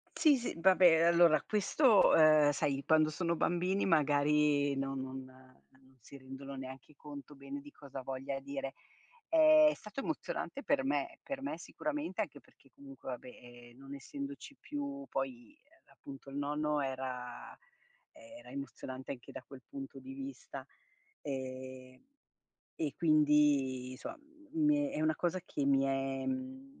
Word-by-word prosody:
Sì, 300 -4 +5
sì, 245 - -3
vabbè, 175 -2 +6
allora 170 -2 +6
questo 210 +2 +4
ehm, 155 -2 +6
sai, 140 0 -1
quando 155 -1 +4
sono 170 +2 -1
bambini 180 +4 +1
magari 145 -2 +3
non 135 0 -2
non 130 0 -6
non 130 0 -21
si 130 - -13
rendono 135 +1 -9
neanche 130 +2 -9
conto 145 0 -10
bene 140 +1 -7
di 145 +1 -13
cosa 135 -2 -9
voglia 135 +1 -4
dire. 135 0 -5 0.5
È 310 -2 +7
stato 210 +5 -7
emozionante 280 -1 -4
per 275 -1 +1
me. 335 +5 -1
Per 275 -1 -5
me 290 +2 -3
sicuramente 305 +1 -4
anche - - -4
perché - - -25
comunque 275 - -12
va 125 - -4
beh, 120 -1 -13
ehm, 120 - -19
non 135 +1 -9
essendoci 280 - -7
più 280 -1 -5
poi 270 +3 -4 0.3
appunto 135 0 -12
il 140 - -7
nonno 150 +1 0
era 130 -2 -4 0.6
ehm, 285 0 -14
era 300 - -13
emozionante 130 - -6
anche 125 -3 -11
da - - -7
quel 130 0 -13
punto 275 -1 -8
di 270 0 -9
vista. 275 0 -7 0.6
Ehm, 130 - -6 0.7
e 150 -3 -2
quindi 145 -5 +3
soma, - - -7
m 305 +1 -9
mhmm, 295 -1 +3
è - - -2
una 155 0 +3
cosa 180 +1 -1
che 145 - -2
mi 135 -1 +4
è, 135 0 -1
mhmm 265 +1 -5
150 Hz, 150 wpm, -33 LUFS, -, 0.7 s, È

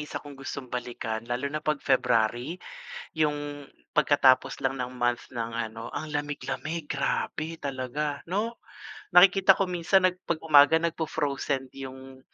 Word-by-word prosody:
isa - - -6
kong 145 -1 -7
gustong 135 -1 -7
balikan, 120 -2 -3
lalo 120 +2 -2
na 155 - -2
'pag 150 0 0
February. 125 +3 +1 0.6
Yung 145 -2 -1 0.2
pagkatapos 135 -3 +3
lang 135 0 0
ng 125 0 -4
month 120 -1 0
ng 115 -1 -3 0.2
ano, 115 +1 -8
ang 155 - -4
lamig-lamig 145 +2 -3
grabe, 155 +3 -2
talaga, 140 +1 -3
'no? 215 +5 -1 0.6
Nakikita 190 +1 +7
ko 195 - +1
minsan 180 +2 +3
nag 185 0 +2
'pag 170 - +1
umaga 150 0 +7
nagfo-frozen 145 -5 -2
yung 130 0 -9
145 Hz, 135 wpm, -27 LUFS, 130-160 Hz, 0.6 s, Nakikita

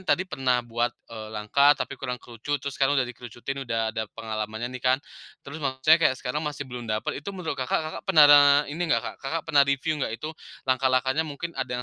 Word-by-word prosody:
tadi 185 - +3
pernah 130 -8 0
buat, 120 +1 0 0.2
eee, 110 -1 -7
langkah 110 +7 +3
tapi - - -4
kurang 125 -2 -3
kerucut 125 +4 -4
terus 140 0 -5
udah 135 -1 +3
kerucutin 120 +3 -7
udah 115 -1 0
ada 110 0 -3
pengalamannya 110 +1 -4
nih 125 - -7
kan, 130 +1 +3 0.5
terus 150 +3 -8
maksudnya 140 +4 +3
kayak 135 -5 +3
sekarang 130 +4 -3
masih 150 -2 -4
belum 125 -3 -8
dapat 110 +5 -2
itu 150 - -8
menurut 180 -3 -3
Kakak, 130 - +1
Kakak 155 - -6
pernah 145 -4 +7
ini 150 +4 -7
nggak, 115 0 -1 0.2
pernah 150 -3 +4
review 140 +3 0
nggak - - -1
itu 155 +1 -5 0.3
langkah-langkahnya 130 +2 +2
mungkin 160 +2 -6
ada - - -4
130 Hz, 190 wpm, -26 LUFS, 120-145 Hz, 0.5 s, pernah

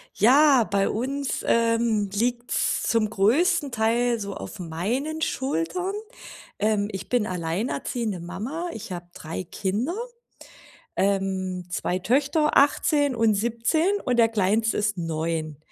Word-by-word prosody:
Ja, 265 +2 +6
bei 195 0 +1
uns, 270 +4 -2
ähm, 230 -3 +2
liegt's 240 +3 0
zum 225 -2 +1
größten 255 - +2
Teil 235 +1 +1
so 200 -1 -5
auf - - -8
meinen 230 - -3
Schultern. 285 - -1 0.7
Ähm, 210 -1 +1
ich 190 -2 -6
bin 245 -4 +1
alleinerziehende 185 +4 -2
Mama, 220 - -5
ich 205 - -8
habe 175 -1 -5
3 165 +3 -6
Kinder, 205 - -2 1.0
ähm, 190 -2 -1
2 180 +1 -1
Töchter, 285 - +1
18 285 0 +3
und 225 -2 +3
17 235 - +1
und 250 - +2
der 230 -1 +6
Kleinste 220 +1 +1
ist 205 -1 0
9. 160 -2 -3
220 Hz, 120 wpm, -25 LUFS, 190-255 Hz, 1.0 s, Ja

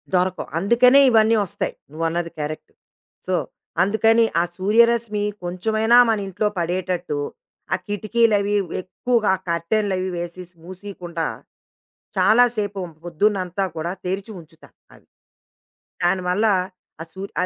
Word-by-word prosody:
దొరకవు. 185 0 0
అందుకనే 240 +8 +5
ఇవన్నీ 225 -1 +4
వస్తాయి. 180 - -4 0.2
నువ్వన్నది 165 +2 -2
కరెక్ట్. 150 +1 -6 0.6
సో, 185 - 0 0.5
అందుకని 225 +3 +3 0.2
ఆ - - +2
సూర్యరశ్మి, 220 +1 +2 0.2
కొంచెమైనా 215 +6 +2
మనింట్లో 205 -1 0
పడేటట్టు, 175 -2 -2 0.6
ఆ - - +4
కిటికీలవి 205 0 +1 0.3
ఎక్కువగా 215 +2 0 0.2
కర్టెన్లు 190 +5 0
అవి 185 0 -2
వేసేసి 175 +1 -7
మూసేయకుండా, 180 -2 -6 0.9
చాలా 240 +3 +5
సేపు 205 -2 -2 0.2
పొద్దునంతా 185 +1 0
కూడా 170 +3 -3
తెరిచి 195 +4 -3
ఉంచుతా 160 0 -18 0.3
అవి. - - -21 1.0
దాని 180 +2 +2
వల్ల, 205 +5 +2 0.5
ఆ 165 - -4
సూర్ 195 +1 -7
195 Hz, 105 wpm, -22 LUFS, 175-215 Hz, 1.0 s, అందుకనే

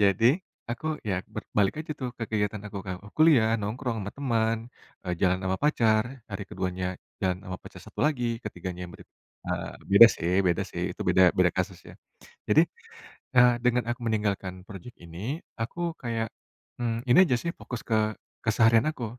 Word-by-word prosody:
Jadi, 100 +3 +4 0.4
aku 125 +6 -4 0.2
ya 95 - +1 0.2
berbalik 100 -2 0
aja 155 - -4
tuh 125 -2 -2
ke 115 - -2
kegiatan 105 -1 -1
aku, 100 - -6
Kak, 95 -1 -3 0.2
kuliah, 155 -8 +6
nongkrong 115 +4 -3
sama 100 0 -4
temen, 115 -5 +1 0.5
eee, 90 -1 -1
jalan 90 -1 +3
sama 95 0 0
pacar, 115 -7 +3 0.3
hari 100 +1 -4
keduanya 90 0 -3 0.3
jalan 90 -2 0
sama 95 0 -5
pacar - - -11
satu - - -8
lagi, 140 -5 0 0.2
ketiganya 90 -3 -6
yang - - -12
ber - - -13 0.4
eee, - - -3 0.2
beda 100 +4 +11
sih 85 +1 -1
beda 85 -2 +2
sih, - - -4
itu - - -18
beda 95 - +5 0.2
beda 90 -1 +5
kasus, 95 -1 -1
ya. - - -12 0.6
Jadi, 155 - +7 0.8
eee, 125 0 +8
dengan 125 0 +3
aku 120 - -3
meninggalkan 105 -4 -1
projek 105 +4 -10
ini, 85 0 -10 0.4
aku 115 +9 -4 0.2
kayak, 115 -2 -2 0.5
mmm, 115 -1 -1
ini 120 - +6
aja 130 -6 +2
sih, 170 - -1
fokus 125 -3 -6
ke 115 - +2 0.5
keseharian 115 +2 +4
aku. 130 -6 -6
110 Hz, 170 wpm, -27 LUFS, 95-120 Hz, 0.8 s, beda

